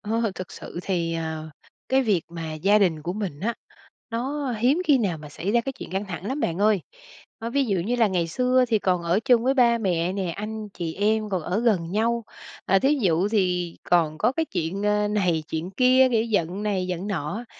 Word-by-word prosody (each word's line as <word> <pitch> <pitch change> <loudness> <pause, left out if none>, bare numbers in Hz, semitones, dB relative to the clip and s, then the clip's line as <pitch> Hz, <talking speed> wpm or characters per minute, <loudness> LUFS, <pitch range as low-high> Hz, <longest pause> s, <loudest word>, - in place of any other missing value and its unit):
Ờ, 225 0 -1
thực 185 -1 -7
sự - - -8
thì, 170 -3 -1
ờ, 160 -1 -4 0.4
cái 265 +1 +3
việc 205 -9 +1
mà 165 -2 -6
gia 195 +7 +3
đình 170 -7 +1
của 175 - -3
mình 185 -8 -4
á, 230 +5 -1 0.6
nó 265 +4 -2
hiếm 260 +10 +2
khi 290 -5 +5
nào 195 -9 -1
mà 150 -1 -10
xảy 175 +7 -3
ra 235 +1 +3
cái 270 +3 -4
chuyện - - -9
căng 195 +2 -2
thẳng 180 -1 -6
lắm 265 +6 -2
bạn 170 - -1
ơi. 205 -1 +3 0.6
Ơ, 230 - -4
ví 275 +2 +1
dụ 200 -5 0
như 220 +8 -1
là 230 -3 +4
ngày 180 -4 0
xưa 250 +8 +2
thì 225 -2 +2
còn 180 -3 +1
ở 170 +4 +2
chung 240 -2 +4
với 265 +2 +3
ba 240 -3 +4
mẹ 180 -4 0
nè, 190 -3 -2
anh 215 +1 -5
chị 170 -4 -5
em 215 +2 +1
còn 185 -3 -1
ở 180 +6 -1
gần 195 -8 +1
nhau, 230 +3 +1 0.4
à, 195 - +4
thí 275 +6 +3
dụ 180 -1 +2
thì 180 -5 0
còn 165 -3 +2
có 200 - +2
cái 320 +4 -1
chuyện, 190 - -3
ơ, 210 0 +2
này 185 -6 +1
chuyện 165 +3 -3
kia, 255 +4 +5
kiểu, 225 -2 +3
giận 205 -3 -1
này 190 -3 -1
giận 180 +2 -3
nọ, 195 +4 -3
200 Hz, 225 wpm, -24 LUFS, 175-230 Hz, 0.6 s, khi